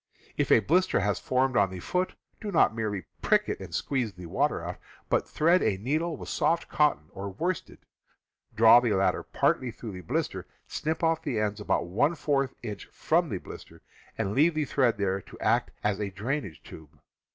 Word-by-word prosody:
If - - 0
a - - +7
blister 170 - +2
has 100 -2 0
formed 130 0 +1
on 100 -3 +4
the 95 -1 -7
foot, 180 - -1 0.2
do 210 -2 -5
not 160 - +4
merely 105 -4 -2 0.2
prick - - +3
it - - -3
and - - -9
squeeze 125 -6 -1
the 90 0 -10
water 85 - 0
out, - - -5 0.3
but - - +1
thread 170 +4 +3
a 95 - +1
needle 155 - -1
with - - -9
soft 170 0 +1
cotton 150 - +2
or 100 +1 -6
worsted, 170 - -3 0.8
draw 115 +2 +8
the 120 -3 0
latter 95 0 +2
partly 130 - 0
through 115 -1 -8
the 90 -1 -8
blister, 85 - -3 0.2
snip 160 +2 -3
off 165 -1 +2
the 115 - -2
ends 105 0 -1
about 105 - 0
one 130 - +1
fourth 140 -4 0
inch 105 -6 -6
from - - 0
the - - -2
blister, - - -12 0.3
and 95 - -1
leave 155 +6 +3
the 155 -1 0
thread 130 -5 +2
there 100 -1 0
to - - -14
act - - +2
as 105 -2 0
a 100 - -1
drainage 100 - -4
tube. 80 -2 -13
115 Hz, 195 wpm, -28 LUFS, 100-150 Hz, 0.8 s, draw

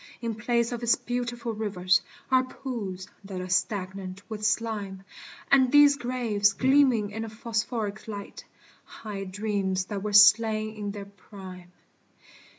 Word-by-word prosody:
In 230 -1 -3
place 235 +2 0
of 240 -1 -4
its 235 -1 +3
beautiful 240 -1 -4
rivers, 185 -4 +1 0.3
Are 260 0 +5
pools 220 -8 -6 0.2
that 195 -2 -6
are 185 - -5
stagnant 185 0 -2
with 215 -2 -6
slime; 210 -3 -1 0.5
And 260 -2 +5
these 290 0 +7
graves 235 -6 +1
gleaming 255 -5 +3
in 220 +2 -4
a 225 - -6
phosphoric 220 -1 -3
light, 205 -2 -7 0.4
Hide 195 -3 -8
dreams 195 -2 -1
that 200 0 -5
were 210 +1 -3
slain 215 +1 +5
in 210 -2 -5
their 200 0 -6
prime. 190 -2 -12
215 Hz, 140 wpm, -27 LUFS, 195-235 Hz, 0.5 s, these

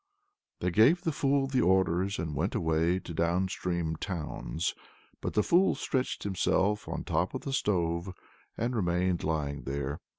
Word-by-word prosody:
They 90 - +1
gave 125 - +5
the 165 - +1
fool 140 -1 +2
their 135 -1 +1
orders 95 +1 +2
and 80 -1 -3
went 70 - -1
away 80 +2 +2
to 90 - -7
the 80 - +1
downstream 85 -2 -1
towns; 85 -2 -3 0.5
but - - -3
the 105 - +4
fool 180 +3 +4
stretched 130 -1 -2
himself 100 +1 +1
on - - -4
top - - -1
of - - -3
the 135 - -4
stove 85 -6 0 0.5
and 120 +2 -1
remained 90 -3 +1
lying 75 -3 -1
there. 70 +1 -3
90 Hz, 160 wpm, -30 LUFS, 80-105 Hz, 0.5 s, gave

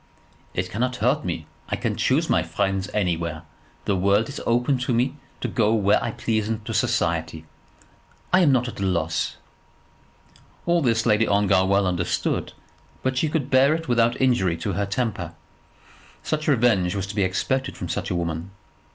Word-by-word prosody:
"It - - -2
cannot 125 +4 -1
hurt 125 +6 +1
me. 85 -3 -3 0.2
I - - 0
can - - -2
choose - - +1
my - - +3
friends 95 -1 -1
anywhere. 85 -5 -1 0.4
The 100 - +1
world 100 +5 +2
is 140 - -6
open 125 +3 +2
to 125 0 -1
me 125 +4 +1 0.3
to - - -1
go 110 -2 +2
where 100 -2 +3
I - - -1
please 110 -1 -1
into 110 -1 -3
society. 80 -1 0 0.9
I 185 - +7
am 165 -6 +5
not 125 -2 +2
at 120 - -7
a - - -2
loss." 85 -4 0 1.3
All 170 0 +3
this 115 -4 +1
Lady 110 -1 +3
Ongar 100 -2 +3
well 100 +1 +3
understood, 90 -1 -1 0.5
but 130 0 0
she 155 - +1
could 150 -3 -2
bear 135 +3 +5
it 165 0 -5
without 115 -1 +2
injury 95 -10 +2
to 85 - -3
her 100 0 -1
temper. 100 -6 -2 0.9
Such 155 0 -2
revenge 115 -10 +3
was 100 -2 -2
to 100 +1 -7
be 105 - +1
expected 130 +8 -1
from - - -5
such - - -3
a - - -1
woman. 85 +1 -3
105 Hz, 175 wpm, -24 LUFS, 95-125 Hz, 1.3 s, I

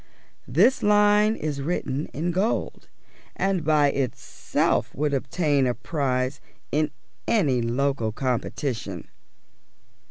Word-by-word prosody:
This 200 - +3
line 210 +1 +4
is 150 -6 -3
written 145 -2 -2
in 170 +4 -3
gold, 195 +6 -1 0.5
and 195 -3 0
by 150 -2 +3
itself 135 -3 -1
would 145 +1 0
obtain 140 0 +1
a 120 - 0
prize 130 -1 -2 0.3
in 155 +1 +1 0.4
any 145 - +2
local 120 -1 0
competition. 120 - -3
145 Hz, 100 wpm, -25 LUFS, 130-175 Hz, 0.5 s, line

